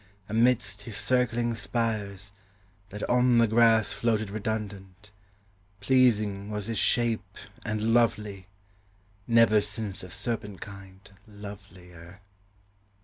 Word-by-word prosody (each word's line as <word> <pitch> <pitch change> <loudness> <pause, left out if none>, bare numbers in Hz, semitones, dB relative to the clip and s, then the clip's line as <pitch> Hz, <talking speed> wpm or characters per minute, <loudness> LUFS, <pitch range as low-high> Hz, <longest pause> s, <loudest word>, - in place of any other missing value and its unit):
Amidst 110 -3 +1
his 110 -1 -6
circling 120 +1 +1
spires, 105 -3 -3 0.6
that 105 +1 -5
on 125 0 +3
the 115 - +6
grass 110 0 +4
Floated 110 -3 0
redundant: 100 -2 -5 0.7
pleasing 105 -4 +2
was 105 -1 -4
his 110 -2 -2
shape 110 -5 0 0.3
And 110 +1 -1
lovely; 105 -5 +1 0.8
never 115 -3 +5
since 105 -1 -5
of 90 - -10
serpent 105 0 -4
kind 95 -1 -11 0.3
Lovelier. 95 -3 -12
105 Hz, 100 wpm, -27 LUFS, 100-115 Hz, 0.8 s, the